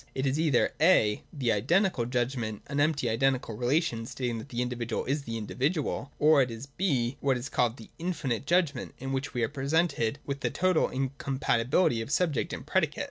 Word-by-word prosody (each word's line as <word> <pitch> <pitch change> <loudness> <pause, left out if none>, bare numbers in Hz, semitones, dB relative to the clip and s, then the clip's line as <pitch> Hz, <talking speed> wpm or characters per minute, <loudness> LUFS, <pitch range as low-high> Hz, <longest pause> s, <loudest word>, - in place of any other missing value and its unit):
It 135 - -1
is 135 +3 +1
either 155 -6 +2
(«) - - -34
the 135 -4 +2
Identical 130 - +2
judgment, 120 -3 -2
an 140 0 -3
empty 145 -3 +2
identical 125 0 +1
relation 120 -2 0
stating 120 -3 -3
that 125 - -10
the 120 -1 -1
individual 120 -2 -3
is 140 +3 0
the 115 0 -4
individual; 140 - -2
or 150 -1 +5
it 125 - +1
is 115 +2 -7
(b) 140 -5 -1
what 135 -2 +1
is 125 +2 -6
called 120 0 +1
the 110 - -13
Infinite 140 -8 -2
judgment, 165 -7 +1
in 135 +1 -4
which 135 +1 -3
we 120 - +1
are - - +2
presented 140 -2 0
with 140 0 -3
the - - -1
total 185 -3 +2
incompatibility 130 -1 0
of 115 - -6
subject 160 -2 0
and - - -6
predicate. - - 0
135 Hz, 190 wpm, -29 LUFS, 120-145 Hz, -, or